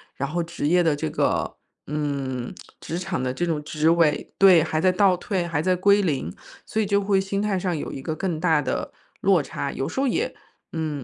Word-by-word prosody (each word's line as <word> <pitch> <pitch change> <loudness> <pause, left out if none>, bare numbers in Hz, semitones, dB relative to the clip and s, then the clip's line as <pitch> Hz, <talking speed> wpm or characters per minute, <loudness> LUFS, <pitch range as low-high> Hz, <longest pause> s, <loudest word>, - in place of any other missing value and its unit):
然 140 +1 -3
后 175 +2 -1
职 165 -3 -3
业 175 +2 +4
的 160 -3 +2
这 110 - -3
个 - - 0 0.3
嗯， 140 -4 -3 0.3
职 170 +2 -4
场 185 -6 -3
的 125 0 -1
这 175 +7 -1
种 155 -3 -1
职 155 +1 +1
位 165 -3 +2
对， 185 -4 +7
还 155 -1 -1
在 185 - +4
倒 185 0 +4
退， 185 -2 -2
还 155 -3 -1
在 185 +1 +2
归 200 +3 +4
零， 140 - -1 0.4
所 220 - -2
以 - - +1
就 200 0 +2
会 195 -1 +2
心 195 +1 -2
态 205 -2 0
上 180 -2 -1
有 - - -5
一 135 - -6
个 160 - -3
更 170 -1 -2
大 160 -3 +3
的 - - -3 0.3
落 - - +4
差。 - - -4
有 - - -3
时 - - -4
候 275 - +2
也 450 - -1 0.4
嗯， 155 -4 -3
170 Hz, 240 characters per minute, -24 LUFS, 150-190 Hz, 0.4 s, 对